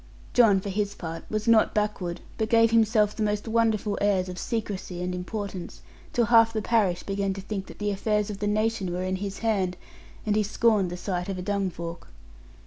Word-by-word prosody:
John 220 -6 +6
for 200 - -5
his 205 +1 -1
part 165 -1 -7
was 215 +1 -2
not 230 -1 +4
backward, 210 -5 -1 0.2
but 220 0 0
gave 230 -1 +5
himself 215 -2 +3
the - - -5
most 210 +1 0
wonderful 220 -2 +1
airs 190 -3 +2
of 180 0 -6
secrecy 200 -6 -3
and 180 0 -2
importance, 180 - -5 0.3
till 240 - +2
half 230 -1 +6
the 220 - -1
parish 200 -7 +2
began 195 -1 -1
to 195 - -6
think 195 -1 -5
that - - -11
the 205 0 -1
affairs 210 +1 0
of 200 - -7
the 205 - -1
nation 215 -2 0
were 180 +1 -2
in 185 0 -1
his 195 0 -5
hand, 190 -5 +1 0.5
and 210 -1 +1
he 215 - +3
scorned 210 -2 +2
the 175 - -5
sight 180 0 -3
of 195 - -3
a 180 - -4
dungfork. 180 -4 -3
205 Hz, 205 wpm, -26 LUFS, 185-220 Hz, 0.5 s, John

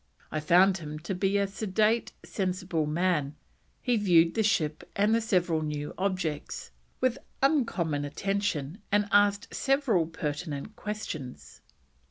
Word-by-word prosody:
I 155 - -1
found 180 +5 +4
him 150 -2 -6
to 170 +5 -4
be 195 +2 +1
a 200 - +2
sedate, 215 +3 0
sensible 185 -5 -1
man; 150 -3 0 0.5
he 245 -2 +2
viewed 170 -5 +4
the 225 - +1
ship 155 -8 +1
and 210 +2 +3
the 230 - +3
several 180 -7 +1
new 150 -1 -3
objects 185 - -3 0.3
with 255 0 +1 0.2
uncommon 200 - +1
attention, 185 0 -2
and 205 0 +3
asked 205 +1 +3
several 270 - +2
pertinent 155 +3 -4
questions." 190 - -6
185 Hz, 130 wpm, -28 LUFS, 155-210 Hz, 0.5 s, found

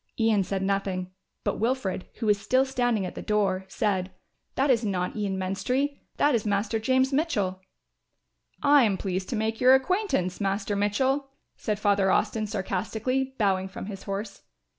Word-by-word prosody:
Ian 220 -3 +3
said 190 +1 -2
nothing, 190 -2 -1 0.3
but - - -1
Wilfred, 225 -5 -1
who 230 - -4
was 205 -2 +3
still 260 +3 +3
standing 245 -6 0
at - - -5
the - - -7
door, 195 -3 0
said, 190 -2 -1 0.5
"That 270 +1 +3
is 235 -2 +2
not 185 -4 -1
Ian 200 -3 -2
Menstrie, 250 +10 -1 0.2
that 290 - +3
is 230 -3 +1
Master 205 +2 0
James 260 +4 +2
Mitchell." 210 - 0 1.0
"I 285 -1 +6
am 205 -4 +2
pleased 185 -1 -3
to - - -1
make 220 +1 -1
your 255 +1 +8
acquaintance, 265 - 0
Master 200 +1 -1
Mitchell," 260 +8 +1 0.3
said 210 -1 -2
Father 200 -2 +3
Austin 215 +3 +1
sarcastically, 220 +6 -2
bowing 190 -3 +1
from 190 - -7
his 195 -1 -7
horse. 200 +1 -5
210 Hz, 160 wpm, -27 LUFS, 195-255 Hz, 1.0 s, your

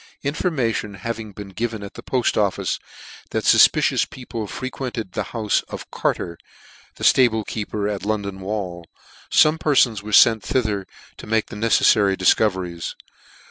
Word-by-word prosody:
In 140 0 -1
formation 120 - -1
having 110 +2 -5
been 100 0 -9
given 110 +1 -4
at 100 - -9
the - - -9
Poft 125 0 0
Office, 100 -3 0 0.5
that - - -2
fufpicious - - +4
people 115 -4 -6
frequented 125 -4 -5
the - - -3
houfe 110 -3 0
of - - -8
Carter, 85 -1 -2 0.6
the - - +4
liable 110 -4 +3
keeper 105 -1 -3
at 100 -2 -3
London 100 -2 -2
Wall, 95 -3 -4 0.5
fome 155 +1 +5
perfons 125 -9 +3
were 105 - -9
fent 110 +1 +6
thither 105 -2 -1 0.3
to - - -10
make 110 0 +1
the - - -7
neceflary 105 -2 +3
difcoveries. 90 -3 +1
110 Hz, 145 wpm, -22 LUFS, 100-115 Hz, 0.6 s, fent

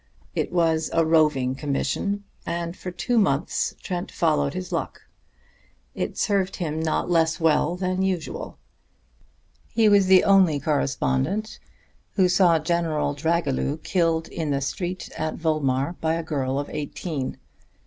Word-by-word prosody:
It - - -2
was 165 -2 +1
a 165 0 +3
roving 150 -5 +3
commission, 150 +9 -2 0.2
and 170 0 -3
for 185 - -6
two 230 +7 0
months 165 -6 0
Trent 180 +1 -4
followed 150 -3 +1
his 185 -1 -5
luck. - - -3 0.9
It - - -4
served 195 -2 +1
him 160 -3 -3
not 160 -1 0
less 165 -1 +2
well 160 +1 +2
than 185 0 -1
usual. 185 -4 -3 1.2
He 225 -1 +5
was 200 -2 +5
the 190 -1 +7
only 190 -7 +4
correspondent 145 +6 -1 0.5
who 190 -3 +4
saw 180 -2 +5
General 160 -2 0
Dragilew 150 -2 0
killed 165 -3 +1
in 160 -3 -3
the 140 -1 0
street 180 +6 -4
at 155 0 -2
Volmar 145 -2 0
by 160 0 +1
a 165 - -3
girl 135 -4 -2
of 145 - -2
eighteen. 150 -1 -4
165 Hz, 140 wpm, -24 LUFS, 150-180 Hz, 1.2 s, the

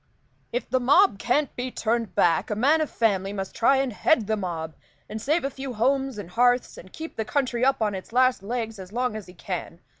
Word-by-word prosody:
"If - - -2
the 260 - +1
mob 280 - +4
can't 280 +6 0
be 250 +1 -3
turned 230 -3 -2
back, 165 -2 +2
a 210 - -1
man 285 +9 +3
of 310 - -1
family 195 -4 0
must 195 -1 -5
try 270 +4 +4
and 265 -3 0
head 235 +1 +2
the 220 +1 0
mob, 165 -5 -4 0.3
and 215 +1 -6
save 305 +8 +1
a 275 - -2
few 265 -1 -6
homes 265 +2 +1
and 190 -4 -7
hearths, 245 +3 +2
and 185 - -13
keep 320 +1 -8
the 220 - 0
country 250 -1 -1
up 265 -3 +3
on 210 -1 0
its 190 +2 -7
last 255 -2 +3
legs 225 0 -4
as 185 0 -9
long 245 0 -1
as 215 -3 -7
he 180 - -14
can. 145 - -5
235 Hz, 230 wpm, -25 LUFS, 205-265 Hz, 0.3 s, mob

